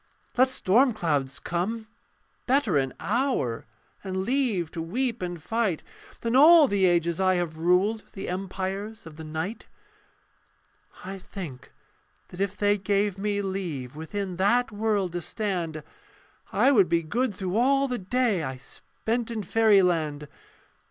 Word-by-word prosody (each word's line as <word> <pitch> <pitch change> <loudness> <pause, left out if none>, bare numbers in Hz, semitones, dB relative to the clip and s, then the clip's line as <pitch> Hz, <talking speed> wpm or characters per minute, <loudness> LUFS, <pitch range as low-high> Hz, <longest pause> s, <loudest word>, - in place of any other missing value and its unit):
Let 255 +1 +4
storm 250 +2 +3
clouds 145 -9 -1
come: 210 +6 -2 0.6
better 255 - +2
an 135 -2 +1
hour, 205 - -1 0.4
And 190 -1 -4
leave 210 - 0
to 165 - -5
weep 235 +7 -2
and 175 -1 -4
fight, 215 -1 -1 0.4
Than 230 +1 0
all 310 +2 +8
the 200 -4 +3
ages 170 -1 +1
I 185 0 +3
have 170 -3 -2
ruled 185 +6 +2
The 195 - -6
empires 190 +3 -4
of 160 -2 -11
the 160 - -8
night. 160 +8 -5 1.4
I 195 +1 -6
think 155 -10 -9 0.6
that 180 - -7
if 200 +1 -1
they 205 0 +2
gave 200 0 0
me 205 0 -1
leave 165 -10 -4
Within 185 +3 -4
that 225 +6 +2
world 205 -3 0
to 175 0 -3
stand, 170 -6 -3 0.7
I 275 - +4
would 200 -9 +4
be 170 0 +2
good 220 +6 -1
through 185 0 -3
all 275 +3 +3
the 250 -2 -3
day 215 -1 +1
I 130 -2 -4
spent 225 - -4
in 225 -3 -3
fairyland. 180 -9 +2
195 Hz, 145 wpm, -26 LUFS, 170-225 Hz, 1.4 s, all